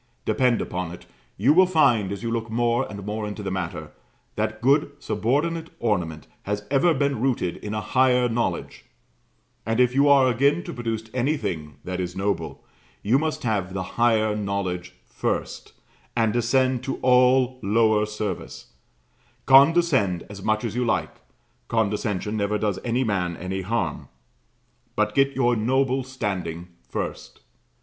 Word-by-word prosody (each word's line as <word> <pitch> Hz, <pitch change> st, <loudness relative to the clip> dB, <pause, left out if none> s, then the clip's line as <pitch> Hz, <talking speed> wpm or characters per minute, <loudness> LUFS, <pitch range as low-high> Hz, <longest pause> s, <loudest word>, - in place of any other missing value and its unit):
Depend 125 Hz, -3 st, +2 dB
upon 90 Hz, -2 st, -4 dB
it 85 Hz, -, -11 dB, 0.3 s
you 125 Hz, +9 st, +4 dB
will 185 Hz, +3 st, +6 dB
find, 125 Hz, -, +3 dB
as 100 Hz, +3 st, -5 dB
you 115 Hz, -, -2 dB
look 115 Hz, -1 st, -2 dB
more 120 Hz, +2 st, 0 dB
and 100 Hz, -2 st, -8 dB
more 105 Hz, 0 st, -3 dB
into 105 Hz, 0 st, -6 dB
the 95 Hz, -, -3 dB
matter, 85 Hz, -5 st, -4 dB, 0.4 s
that -, -, -2 dB
good 140 Hz, +4 st, +3 dB
subordinate 150 Hz, +8 st, -1 dB
ornament 85 Hz, -9 st, -1 dB, 0.2 s
has 105 Hz, +1 st, -4 dB
ever 145 Hz, +5 st, +4 dB
been 140 Hz, -5 st, 0 dB
rooted 120 Hz, -9 st, 0 dB
in 105 Hz, 0 st, -5 dB
a 105 Hz, -, -2 dB
higher 125 Hz, +2 st, +3 dB
knowledge; 115 Hz, -7 st, -3 dB, 0.8 s
and 115 Hz, +2 st, -1 dB
if 125 Hz, 0 st, +4 dB
you 140 Hz, +2 st, +4 dB
are 135 Hz, -2 st, +6 dB
again 140 Hz, +8 st, +2 dB
to 175 Hz, -, -7 dB
produce 115 Hz, -2 st, -3 dB
anything 105 Hz, -, -2 dB
that 90 Hz, 0 st, -4 dB
is 90 Hz, -1 st, -4 dB
noble, 100 Hz, +1 st, -3 dB, 0.4 s
you 120 Hz, +6 st, +3 dB
must 155 Hz, 0 st, -2 dB
have 100 Hz, -5 st, -1 dB
the 95 Hz, -, -2 dB, 0.2 s
higher 110 Hz, -3 st, +3 dB
knowledge 95 Hz, -3 st, -3 dB
first, -, -, -4 dB, 0.4 s
and 115 Hz, -3 st, +2 dB
descend 130 Hz, +1 st, +2 dB
to 135 Hz, -, -2 dB
all 125 Hz, 0 st, +4 dB
lower 110 Hz, 0 st, +2 dB
service; 105 Hz, -3 st, -6 dB, 0.7 s
condescend 135 Hz, -, +5 dB
as 100 Hz, -1 st, -9 dB
much 110 Hz, +2 st, 0 dB
as 115 Hz, -2 st, -3 dB
you 125 Hz, -, +1 dB
like, 120 Hz, -2 st, 0 dB, 0.5 s
condescension 105 Hz, -2 st, -1 dB
never 105 Hz, 0 st, 0 dB
does 105 Hz, -2 st, -1 dB
any 120 Hz, +2 st, 0 dB
man 90 Hz, -7 st, -1 dB
any 95 Hz, +1 st, -4 dB
harm, 95 Hz, -5 st, -2 dB, 0.9 s
but 105 Hz, 0 st, +1 dB
get 135 Hz, +2 st, +2 dB
your 120 Hz, -2 st, +2 dB
noble 130 Hz, +4 st, +1 dB
standing 95 Hz, -9 st, -4 dB, 0.2 s
first. -, -, -5 dB
115 Hz, 150 wpm, -24 LUFS, 100-130 Hz, 0.9 s, will